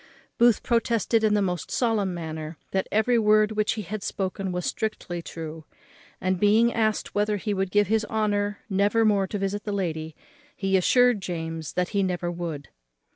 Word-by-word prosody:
Booth 235 Hz, -1 st, +5 dB
protested 230 Hz, -2 st, +1 dB
in 215 Hz, -1 st, +3 dB
the 205 Hz, -, +2 dB
most 180 Hz, -3 st, -2 dB
solemn 220 Hz, -6 st, +1 dB
manner 160 Hz, -2 st, -6 dB
that 190 Hz, 0 st, 0 dB
every 230 Hz, +3 st, +3 dB
word 215 Hz, 0 st, +4 dB
which 215 Hz, -1 st, +1 dB
he 215 Hz, -, -5 dB
had 205 Hz, +3 st, -5 dB
spoken 190 Hz, 0 st, -3 dB
was 180 Hz, 0 st, -3 dB
strictly 215 Hz, -8 st, -3 dB
true; 160 Hz, -1 st, -7 dB, 0.6 s
and 185 Hz, -1 st, 0 dB
being 220 Hz, +4 st, +4 dB
asked 215 Hz, -2 st, 0 dB
whether 210 Hz, 0 st, +1 dB
he 210 Hz, +1 st, -2 dB
would 195 Hz, -1 st, -1 dB
give 205 Hz, +2 st, +3 dB
his 220 Hz, +2 st, +1 dB
honour 205 Hz, -1 st, -1 dB
never 205 Hz, +2 st, +2 dB
more 200 Hz, -3 st, +3 dB
to 205 Hz, -, -3 dB
visit 200 Hz, +1 st, -2 dB
the 210 Hz, -, -3 dB
lady, 160 Hz, -5 st, -3 dB, 0.4 s
he 195 Hz, -1 st, 0 dB
assured 245 Hz, +4 st, +4 dB
James 165 Hz, -3 st, -5 dB
that 180 Hz, -1 st, 0 dB
he 200 Hz, -2 st, 0 dB
never 180 Hz, -2 st, -1 dB
would. 165 Hz, -5 st, -5 dB
200 Hz, 180 wpm, -25 LUFS, 180-215 Hz, 0.6 s, Booth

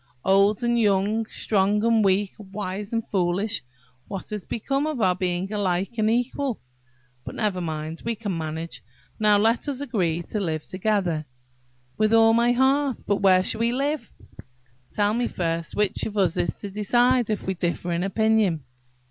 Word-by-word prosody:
"Old 200 Hz, +4 st, +3 dB
and 240 Hz, 0 st, +2 dB
young–strong 210 Hz, 0 st, +1 dB
and 230 Hz, -1 st, +3 dB
weak–wise 200 Hz, 0 st, -2 dB
and 230 Hz, -1 st, -2 dB
foolish–what 175 Hz, -, -3 dB
has 210 Hz, -3 st, -5 dB
become 275 Hz, +6 st, -1 dB
of 305 Hz, -5 st, -3 dB
our 185 Hz, -4 st, +4 dB
being 185 Hz, +2 st, -2 dB
alike 195 Hz, +2 st, -1 dB
and 215 Hz, 0 st, +3 dB
equal? 245 Hz, +2 st, -1 dB, 0.6 s
But -, -, -8 dB
never 205 Hz, -5 st, -1 dB
mind, 160 Hz, -1 st, -4 dB
we 230 Hz, 0 st, -1 dB
can 205 Hz, -4 st, -4 dB
manage. 160 Hz, +1 st, -5 dB, 0.4 s
Now 210 Hz, -1 st, +5 dB
let 225 Hz, +6 st, +2 dB
us 275 Hz, -3 st, -2 dB
agree 180 Hz, -, -1 dB
to 215 Hz, -, -1 dB
live 160 Hz, -5 st, -2 dB
together." 185 Hz, -6 st, -1 dB, 0.7 s
"With 215 Hz, +1 st, +4 dB
all 225 Hz, 0 st, +6 dB
my 235 Hz, +1 st, +4 dB
heart. 265 Hz, +1 st, +2 dB
But 205 Hz, -, +1 dB
where 185 Hz, -2 st, +4 dB
shall 220 Hz, -, -1 dB
we 235 Hz, +1 st, +2 dB
live?" 275 Hz, -1 st, -2 dB, 0.8 s
"Tell 205 Hz, 0 st, +1 dB
me 240 Hz, +1 st, 0 dB
first 165 Hz, -1 st, -2 dB
which 210 Hz, -1 st, 0 dB
of 210 Hz, -1 st, -7 dB
us 185 Hz, -4 st, +2 dB
is -, -, -1 dB
to 200 Hz, -, -8 dB
decide, 240 Hz, +4 st, +2 dB
if 215 Hz, -, -1 dB
we 190 Hz, -, 0 dB
differ 175 Hz, 0 st, -2 dB
in 170 Hz, 0 st, 0 dB
opinion?" 200 Hz, -4 st, +1 dB
205 Hz, 160 wpm, -24 LUFS, 185-225 Hz, 0.8 s, all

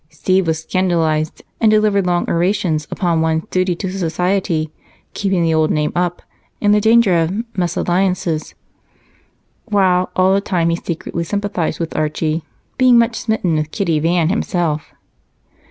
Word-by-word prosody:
Steve 180 Hz, +4 st, 0 dB
was 160 Hz, -1 st, +1 dB
scandalized 160 Hz, -3 st, 0 dB, 0.2 s
and 225 Hz, -, +4 dB
delivered 210 Hz, -3 st, +2 dB
long 175 Hz, -1 st, 0 dB
orations 170 Hz, -3 st, 0 dB
upon 170 Hz, -4 st, 0 dB
one's 160 Hz, 0 st, 0 dB
duty 185 Hz, -1 st, +1 dB
to 185 Hz, +2 st, -4 dB
society, 175 Hz, -3 st, -1 dB, 0.4 s
keeping 195 Hz, -4 st, 0 dB
the 165 Hz, -1 st, +2 dB
old 155 Hz, -1 st, +2 dB
name 150 Hz, -1 st, 0 dB
up, 175 Hz, 0 st, -1 dB, 0.4 s
and 205 Hz, 0 st, +3 dB
the 210 Hz, -, +3 dB
danger 220 Hz, -5 st, +4 dB
of 165 Hz, -, 0 dB, 0.3 s
mésalliances, 175 Hz, -2 st, -1 dB, 1.1 s
while 190 Hz, -4 st, +2 dB
all 185 Hz, +1 st, +3 dB
the 200 Hz, -, +2 dB
time 175 Hz, -4 st, 0 dB
he -, -, +1 dB
secretly 170 Hz, 0 st, -4 dB
sympathized 200 Hz, -2 st, -2 dB
with 165 Hz, -1 st, -4 dB
Archie, 155 Hz, +1 st, -1 dB, 0.4 s
being 255 Hz, -2 st, +6 dB
much 230 Hz, 0 st, +3 dB
smitten 220 Hz, -8 st, -1 dB
with 155 Hz, 0 st, -2 dB
Kitty 165 Hz, -3 st, 0 dB
Van 165 Hz, +1 st, +1 dB
himself. 175 Hz, -7 st, -1 dB
175 Hz, 145 wpm, -18 LUFS, 160-195 Hz, 1.1 s, being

